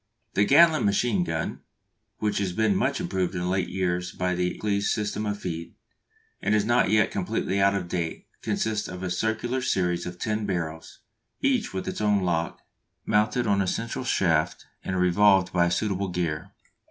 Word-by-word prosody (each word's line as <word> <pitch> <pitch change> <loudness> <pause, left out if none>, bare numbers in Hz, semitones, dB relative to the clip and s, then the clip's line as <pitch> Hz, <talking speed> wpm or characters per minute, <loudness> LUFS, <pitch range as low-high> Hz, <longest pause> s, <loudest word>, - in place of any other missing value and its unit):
The 100 - +3
Gatling 160 +5 +6
machine 100 -1 +2
gun, 80 -1 -3 0.6
which 105 -2 0
has 95 -3 -1
been 110 0 +2
much - - +1
improved 95 +1 -1
in 90 0 -1
late 95 0 0
years 90 -1 -1
by 90 0 -1
the 90 0 -1
Accles 100 -1 0
system 105 0 -2
of 105 0 -2
"feed," 85 -3 -5 0.7
and 105 - +2
is 105 -1 +2
not 120 -3 +3
yet 105 +1 +3
completely 100 +1 -1
out 100 0 +4
of 95 -3 -2
date, 85 -2 -3 0.2
consists 110 -1 -1
of 90 0 -7
a 90 - -2
circular 110 +7 -1
series 90 -8 0
of 90 0 -7
ten 105 +1 -2
barrels 80 -4 -4 0.4
each 265 -6 +1
with 95 - -4
its - - -3
own 105 -2 +2
lock 85 -2 -1 0.4
mounted 110 +3 +2
on 100 -2 +2
a 95 - 0
central 115 +6 -2
shaft 85 -8 +1 0.2
and 95 -1 -2
revolved 95 0 +4
by 85 -1 +3
a - - -1
suitable 100 0 0
gear. 90 +1 -3
95 Hz, 175 wpm, -26 LUFS, 90-105 Hz, 0.7 s, Gatling